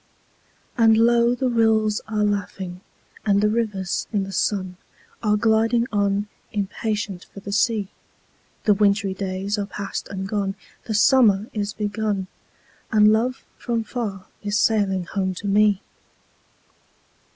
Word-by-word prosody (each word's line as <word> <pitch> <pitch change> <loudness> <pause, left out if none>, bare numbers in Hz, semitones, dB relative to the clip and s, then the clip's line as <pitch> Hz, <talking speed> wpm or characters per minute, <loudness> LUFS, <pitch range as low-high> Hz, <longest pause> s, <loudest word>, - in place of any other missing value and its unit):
And 225 -1 +6
low 235 +1 +4
the 255 +1 -1
rills 220 -3 +2
are 215 -1 0
laughing, 195 -3 -3 0.4
and 200 -2 +3
the 210 +1 +3
rivers 205 -6 -1
in 205 -3 0
the 195 - -6
sun 185 -2 -1 0.4
Are 210 -2 +2
gliding 225 +2 +2
on, 200 0 +1 0.2
impatient 205 -2 -3
for - - -10
the 200 - -6
sea; 205 -1 +1 0.7
The 210 - +5
wintry 200 -1 +2
days 195 +2 -3
are 200 - -2
past 200 -1 -5
and 190 -1 -5
gone, 195 -1 -1 0.3
the 220 - -2
summer 210 -3 +5
is 205 -1 -2
begun, 210 -2 -2 0.7
And 215 0 +6
love 245 +4 -1
from 230 -2 -1
far 210 -5 -4 0.2
is 205 0 -1
sailing 200 -4 +2
home 190 0 -2
to 205 - -8
me! 205 -1 +3
210 Hz, 135 wpm, -23 LUFS, 195-220 Hz, 0.7 s, And